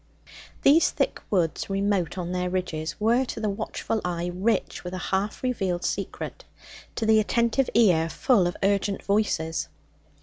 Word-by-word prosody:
These 310 +4 +6
thick - - -1
woods, 175 -3 0
remote 195 -3 0
on 175 -1 -3
their 180 0 -1
ridges, 180 -3 -3
were 230 +4 +3
to 245 - -6
the 215 -2 0
watchful 220 +1 -3
eye 175 0 -2
rich 200 +6 -1
with 180 +1 -5
a 185 - -5
half 200 +5 -1
revealed 190 -8 -1
secret, - - -4 0.5
to 225 - -1
the 220 0 +5
attentive 235 +4 +1
ear 175 -8 +4
full 205 - +3
of 175 - -4
urgent 200 0 +1
voices. 195 -6 0
195 Hz, 155 wpm, -26 LUFS, 180-220 Hz, 0.5 s, These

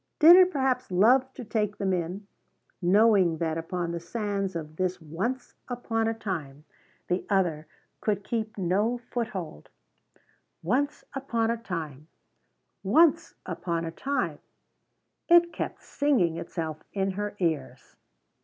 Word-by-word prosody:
Did 330 +3 +9
it 365 0 +7
perhaps 265 -6 0
love 245 +8 +4
to 250 - -7
take 210 -2 -1
them 190 -1 0
in, 180 +3 -3 0.6
knowing 190 -2 +4
that 160 -1 -1
upon 170 +1 -3
the 170 - -3
sands 195 +1 -3
of 155 -1 -6
this 185 0 -1
once 190 - -4
upon 230 -2 -1
a 225 - +1
time 155 -10 -5 0.4
the 180 +1 0
other 170 -6 +1 0.3
could 205 -2 -1
keep 220 0 -3
no 200 +6 +1
foothold? 220 - -5 0.9
"Once 275 - 0
upon 235 -4 0
a 235 - -1
Time 160 - -6 0.7
Once 325 - +3
upon 170 -2 -3
a 165 - -4
Time" 275 +11 -2 0.9
it 345 0 +6
kept - - -5
singing 255 - +1
itself 160 -2 -4 0.2
in 195 -1 0
her 205 +2 -4
ears. 150 -8 -3
195 Hz, 130 wpm, -27 LUFS, 170-235 Hz, 0.9 s, Did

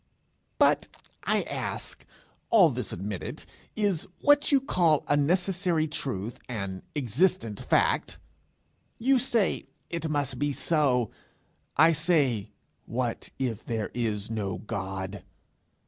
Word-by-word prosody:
'But, - - +4 0.4
I - - +2
ask, - - -5 0.5
all 185 -9 +6
this 125 0 -3
admitted 95 +1 -5 0.3
is 200 -6 0
what 290 0 +4
you 280 - +6
call 175 - +2
a 145 - +3
necessary 175 +1 +1
truth 120 -7 -4
an 100 -5 -4
existent 125 - +1
fact? - - +1 0.8
You 265 +2 +3
say, 235 -6 +1 0.2
"It 165 -2 -2
must 145 -3 -1
be 145 0 0
so;" 135 -8 +2 0.7
I 160 +3 +7
say, 150 - +2 0.4
"What 120 -1 -2
if 120 -4 -2
there 110 -3 -3
is 110 -3 -2
no 100 -5 -2
God!" 95 -1 -5
140 Hz, 115 wpm, -28 LUFS, 110-175 Hz, 0.8 s, I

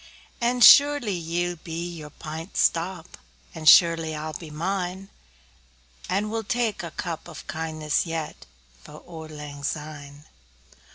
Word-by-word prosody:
And 240 +1 +2
surely 285 -7 +7
ye'll 175 +1 -2
be 165 +2 -5
your 155 -3 -9
pint 160 +4 -8
stowp, 170 0 +1 0.5
And 155 -1 +3
surely 165 -2 +6
I'll 155 +1 -5
be 160 +1 -8
mine; 185 +4 -3 1.0
And 210 +2 -1
we'll 225 0 -2
tak 235 -5 -1
a 170 - -6
cup 170 0 -6
o' - - -11
kindness 155 0 -2
yet 165 -2 -5 0.4
For - - -12
auld 160 -2 -9
lang 150 -2 -9
syne! 145 -1 -6
165 Hz, 130 wpm, -25 LUFS, 155-190 Hz, 1.0 s, surely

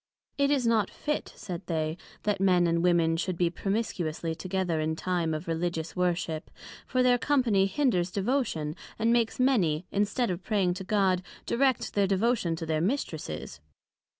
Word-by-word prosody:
It 280 0 +4
is 275 -4 +2
not 225 -3 +3
fit, 300 0 -3
said 185 -5 -6
they, 160 -2 -1 0.3
that 205 -2 0
Men 180 -2 +4
and 170 0 +2
Women 170 -2 +3
should 180 +1 -2
be 170 -1 +2
promiscuously 175 -5 -2
together 180 -1 -1
in 155 +1 0
time 175 -1 -1
of 155 +2 -4
Religious 165 0 -2
Worship; 175 -3 -1 0.4
for 255 -1 +2
their 245 -1 +4
company 235 -10 +3
hinders 195 -5 +1
Devotion, 195 - -1 0.2
and 225 +1 +2
makes 235 0 +1
many, 185 - +2
instead 205 +3 +1
of 175 +1 -4
praying 195 -4 +1
to 190 +2 -6
God, 190 -2 +2 0.2
direct 260 0 +1
their 200 -1 +2
Devotion 195 -3 +1
to 165 0 -5
their 155 -1 0
Mistresses. 160 - -3
185 Hz, 160 wpm, -28 LUFS, 165-225 Hz, 0.4 s, It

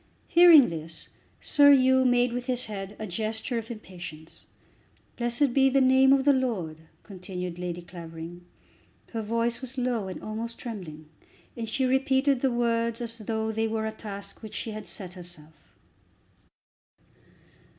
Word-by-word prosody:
Hearing 335 -6 +8
this 160 0 -8 0.3
Sir 285 -1 +6
Hugh 260 -1 +4
made 245 -1 +3
with 245 +1 -4
his 250 -1 +1
head 200 -1 -6
a 215 - -5
gesture 220 +5 -3
of 225 - -9
impatience. 175 -8 -10 0.7
"Blessed 240 +2 +1
be 270 0 +5
the 275 +1 +3
name 265 0 +5
of 270 -1 +4
the 285 - +6
Lord," 195 - -2 0.2
continued 180 -2 -7
Lady 175 -1 -4
Clavering. 170 0 -9 0.7
Her 225 - -2
voice 230 +3 -1
was 260 0 -6
low 245 -5 -1
and 185 - -6
almost 225 +2 -5
trembling, 170 -10 -8 0.5
and 230 -2 -5
she 260 +4 0
repeated 265 +1 +2
the 270 - +3
words 235 -1 0
as 230 -1 -6
though 220 +1 -2
they 225 +1 0
were 220 0 -2
a 220 - -2
task 205 -2 -8
which 215 -2 -9
she 225 - -3
had 215 0 -7
set 185 -3 -7
herself. 170 -4 -14
225 Hz, 150 wpm, -27 LUFS, 185-255 Hz, 0.7 s, Hearing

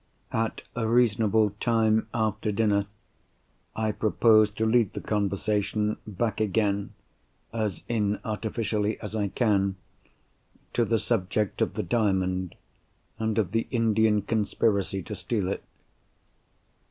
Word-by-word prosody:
At 115 0 -1
a 115 -2 -1
reasonable 110 -2 +3
time 110 -2 +2
after 110 -2 -1
dinner 100 -1 +1 0.9
I 110 -1 0
propose 110 0 +4
to 110 +2 -2
lead 110 -2 +3
the - - -4
conversation 105 +1 0
back 105 +1 -2
again—as 105 -1 -3
inartificially 110 0 -1
as 105 0 -6
I 105 -2 0
can—to 100 +2 -3
the 115 - +2
subject 105 -2 -1
of - - 0
the - - -1
Diamond, 95 -5 0 0.6
and 110 -1 -1
of 100 -5 +1
the 115 +1 0
Indian 110 -3 +2
conspiracy 100 -3 0
to 105 - -7
steal 100 +1 -2
it. 100 - -3
105 Hz, 110 wpm, -27 LUFS, 100-110 Hz, 0.9 s, propose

